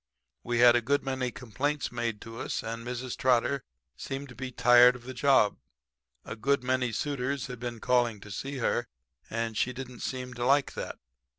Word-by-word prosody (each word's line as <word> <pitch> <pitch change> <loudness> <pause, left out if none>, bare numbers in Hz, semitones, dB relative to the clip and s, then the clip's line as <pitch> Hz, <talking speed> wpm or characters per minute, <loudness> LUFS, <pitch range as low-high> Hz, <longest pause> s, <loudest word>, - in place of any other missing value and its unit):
We 120 0 -2
had 120 0 +7
a 120 - +3
good 140 +5 +1
many 130 -2 -1
complaints 135 +5 -2
made 115 -3 -3
to 115 0 -9
us; - - -3
and 115 +1 -5
Mrs. 125 +1 -4
Trotter 130 +2 +2 0.3
seemed 135 - -6
to 120 - -12
be 130 0 -5
tired 125 0 +7
of 125 - -11
the 130 +1 -7
job. 135 -7 +4 0.7
A - - -6
good 135 +4 +1
many 125 -1 +1
suitors 140 +2 -2
had 125 -3 -7
been 120 -1 -5
calling 120 -3 +2
to 105 - -11
see 135 +7 -4
her, 120 -1 0 0.4
and 115 0 -2
she 125 - 0
didn't 125 -1 -8
seem 125 -1 -4
to 120 0 -4
like 135 +2 +3
that. - - -5
125 Hz, 190 wpm, -29 LUFS, 120-130 Hz, 0.7 s, had